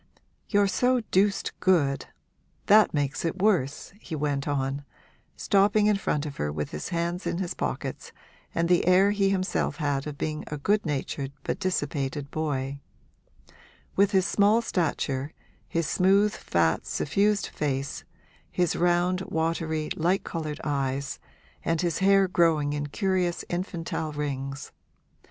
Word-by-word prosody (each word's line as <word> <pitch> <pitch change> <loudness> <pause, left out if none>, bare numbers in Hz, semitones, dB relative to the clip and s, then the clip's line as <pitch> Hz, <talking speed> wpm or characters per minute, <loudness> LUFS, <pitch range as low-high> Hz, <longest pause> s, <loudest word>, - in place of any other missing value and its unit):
You're 205 -2 +4
so 250 +5 +2
deuced 200 +2 +2
good 155 -8 +2 0.6
that 215 +1 +6
makes 145 -2 -1
it 170 +3 -2
worse,' 180 -7 +1
he 160 - -6
went 145 -2 -1
on, 140 0 -1 0.5
stopping 205 +1 +3
in 210 0 +4
front 150 -6 -1
of 145 -2 -6
her 75 0 -1
with 75 0 -4
his 75 - -5
hands 170 +2 -2
in - - -1
his 180 -2 -2
pockets - - -4 0.4
and 170 0 +1
the 175 0 +3
air 190 +2 +5
he 200 -1 +2
himself 190 -1 0
had 145 -3 -1
of 145 -1 -6
being 155 +1 -3
a 150 - -4
good 205 +6 +1
natured 140 -1 -3
but - - -2
dissipated 145 -5 -2
boy; 140 -3 -2 1.2
with 200 0 +4
his 190 -2 +2
small 210 +4 +3
stature, 145 - -1 0.3
his 165 -1 -1
smooth, 195 +6 +3
fat, 80 -1 0
suffused 200 +7 +1
face, 140 -2 -3 0.5
his 175 -3 +1
round, 175 +1 +2
watery, 160 -1 -1
light 180 +4 +1
coloured 155 -3 -4
eyes 140 -1 -2 0.4
and 165 0 0
his 170 -3 0
hair 195 0 +5
growing 160 -5 +2
in 145 0 -2
curious 185 +1 0
infantile 170 -3 -3
rings. 140 -2 -4
165 Hz, 140 wpm, -27 LUFS, 145-190 Hz, 1.2 s, that